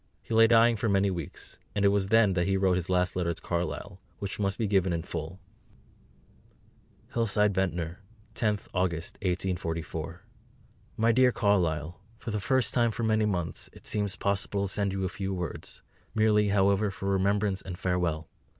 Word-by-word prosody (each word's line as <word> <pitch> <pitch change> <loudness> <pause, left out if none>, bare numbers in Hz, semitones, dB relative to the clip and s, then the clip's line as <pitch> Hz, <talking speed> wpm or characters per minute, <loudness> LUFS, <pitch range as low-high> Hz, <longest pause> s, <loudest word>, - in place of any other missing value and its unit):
He - - -6
lay 115 0 +7
dying 115 0 +5
for 110 +1 0
many 100 0 +2
weeks, 85 -5 -7 0.2
and 100 -1 +2
it - - +7
was 100 -1 +1
then 110 -2 +4
that 90 0 0
he 95 0 +2
wrote 95 -1 +3
his 90 -1 -2
last 90 -1 +1
letter 90 -2 0
to - - -8
Carlyle, 90 +2 -3 0.2
which 100 0 -5
must 100 -1 0
be 115 - 0
given 95 -3 +2
in 85 -1 -2
full: 80 +2 -6 1.7
HILLSIDE, 105 -3 +2
VENTNOR, 90 -2 -2 0.3
10th 105 -3 -1
August 85 -3 -1
1844. 85 -2 -3 0.7
MY 115 +1 +4
DEAR 125 +2 +5
CARLYLE, 90 -6 0 0.2
For 120 -1 -6
the 105 - -1
first 115 +5 +2
time 120 -2 +3
for 115 +1 -4
many 110 -1 +2
months 90 -5 -3
it - - -15
seems 105 -2 0
possible 100 0 -1
to - - -4
send 100 -2 0
you 95 0 -2
a - - +1
few 95 +1 -4
words; 90 -4 -6 0.3
merely, 105 -1 +4
however, 100 +1 +3
for 95 0 -6
Remembrance 100 0 +1
and 90 -2 -7
Farewell. 85 -4 -1
95 Hz, 175 wpm, -28 LUFS, 90-105 Hz, 1.7 s, lay